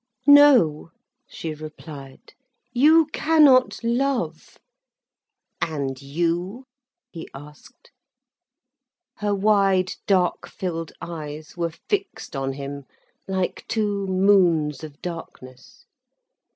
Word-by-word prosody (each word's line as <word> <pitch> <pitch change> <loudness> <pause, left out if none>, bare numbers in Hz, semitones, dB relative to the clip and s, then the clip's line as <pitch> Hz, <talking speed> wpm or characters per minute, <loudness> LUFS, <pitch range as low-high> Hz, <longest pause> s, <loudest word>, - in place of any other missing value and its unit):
"No," 280 - +6 0.4
she 160 -2 -6
replied. 150 -3 -11 0.4
"You 310 +6 +5
cannot 290 -7 +4
love." 235 - -2 1.0
"And 140 -4 -3
you?" 175 - -2 0.5
he 165 - -9
asked. 145 +2 -15 1.3
Her 205 -1 -1
wide, 195 -2 +2
dark 185 -3 +1
filled 165 -3 -5
eyes 155 -3 -8
were 170 -1 -1 0.2
fixed 400 - -3
on 135 0 -2
him, 140 0 -7 0.4
like 190 -1 -2
two 205 -3 -1
moons 185 -6 +2
of 150 -2 -11
darkness. 130 -7 -10
175 Hz, 85 wpm, -23 LUFS, 150-210 Hz, 1.3 s, No